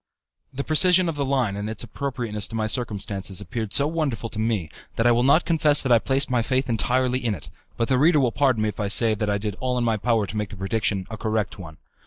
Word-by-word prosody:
The 140 +1 -4
precision 180 +4 +4
of 165 - -2
the 145 - -1
line 130 -7 0
and 105 +1 -4
its 110 +1 -3
appropriateness 120 -3 -3
to - - -8
my 110 -1 -1
circumstances 105 -4 -2
appeared 100 +2 -5
so 140 - +2
wonderful 145 -8 -2
to 110 - -7
me, 110 -6 -1 0.3
that 115 - 0
I 120 - +6
will 120 0 +2
not 140 +6 +4
confess 155 -3 +3
that 130 - -1
I 120 - +6
placed 135 +4 +1
my 125 -2 +1
faith 130 +2 -1
entirely 125 +2 +1
in 110 -4 0
it; 75 - -12 0.3
but 115 - 0
the 130 -1 +2
reader 155 +2 +4
will 125 -4 +2
pardon 130 -4 +1
me 110 - +1
if 105 - -9
I 105 - -1
say 110 +2 +4
that 105 -1 -2
I 100 - +1
did 105 -1 -4
all 125 -1 -1
in 120 - 0
my 115 -2 +1
power 115 0 +1
to 105 - -6
make 105 -1 -2
the 100 - -10
prediction 95 0 -1
a 110 - -5
correct 110 -2 -2
one. 80 -4 -10
115 Hz, 260 wpm, -23 LUFS, 105-130 Hz, 0.3 s, I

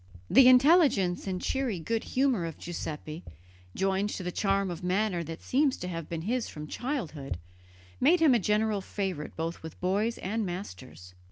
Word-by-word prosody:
The 260 +3 +8
intelligence 255 - +5
and 185 -1 -2
cheery 255 -7 -1
good 225 +7 -2
humour 255 -10 +1
of 165 - -7
Giuseppe, 160 -1 -6 0.5
joined 195 +1 +1
to 190 - -5
the 180 - -3
charm 195 0 0
of 175 +1 -7
manner 185 -1 0
that 165 +1 -8
seems 275 0 +2
to 180 - -5
have 165 -3 -5
been 165 -1 -4
his 240 +4 -1
from 150 0 -7
childhood, 165 - -4
soon - - -11 0.6
made 330 +7 +5
him 315 -5 +5
a 240 - +4
general 210 +1 +1
favourite 190 -6 -4
both 165 +1 -4
with 160 -1 -9
boys 205 +6 0
and 220 +4 -2
masters. 155 - -7
195 Hz, 175 wpm, -29 LUFS, 170-235 Hz, 0.6 s, The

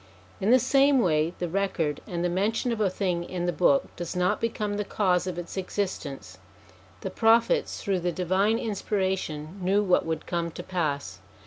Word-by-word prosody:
In 195 - 0
the 250 - +8
same 275 +2 +4
way, 165 -6 +2
the 175 - -2
record 170 -5 -1
and 175 -1 -2
the - - +3
mention 210 +7 0
of 225 -2 -2
a 200 - +3
thing 180 -2 -1
in 175 0 -4
the 175 - 0
Book 260 - +2
does 175 +1 -5
not 180 0 +1
become 210 -2 -1
the 210 - 0
cause 185 -3 +1
of 180 -2 -4
its 175 +2 -6
existence. 145 - -4 0.6
The - - -4
Prophets, 235 - +2
through 195 -3 0
the 175 0 -1
divine 190 +5 +1
inspira 200 -3 -1
tion, 155 +1 -7
knew 195 +3 +2
what 180 -3 +3
would 160 -1 -3
come 170 -1 -2
to - - -7
pass. 145 - -2
185 Hz, 190 wpm, -27 LUFS, 170-210 Hz, 0.6 s, the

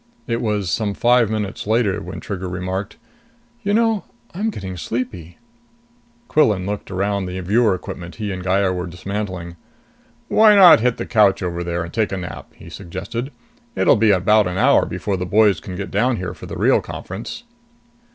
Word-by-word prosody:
It 115 0 -2
was 105 -5 -1
some 105 -3 -1
five 120 -2 +3
minutes 105 -2 -3
later 110 -3 +1
when - - -7
Trigger 95 -2 -5
remarked, 95 +3 -4 0.6
"You 200 -3 -1
know, 225 -1 +2 0.3
I'm 205 +6 -1
getting 95 - -6
sleepy." 90 -1 -5 0.9
Quillan 105 -11 +2
looked 105 +1 -4
around 100 0 -1
the 90 +1 -5
viewer 105 +3 +2
equipment 85 -1 -8
he 105 -2 -4
and 95 -1 -5
Gaya 95 0 +1
were 90 0 -4
dismantling. 90 -1 -5 0.7
"Why 215 -1 +6
not 185 - +9
hit 125 +1 +1
the - - -4
couch 105 -4 +3
over 85 -1 -3
there 85 0 -2
and 85 - -9
take 110 -2 0
a 95 - -2
nap?" 90 -2 -8
he - - -14
suggested. 100 - -6 0.4
"It'll - - +4
be 110 -1 +3
about 105 +2 +4
an 90 0 -3
hour - - +4
before 100 -2 -3
the 90 - -3
boys 105 +1 +4
can 95 - -8
get 100 +2 -5
down 120 +5 +2
here 90 -2 -4
for - - -11
the - - -6
real - - +3
conference." 235 - -7
100 Hz, 180 wpm, -20 LUFS, 90-115 Hz, 0.9 s, not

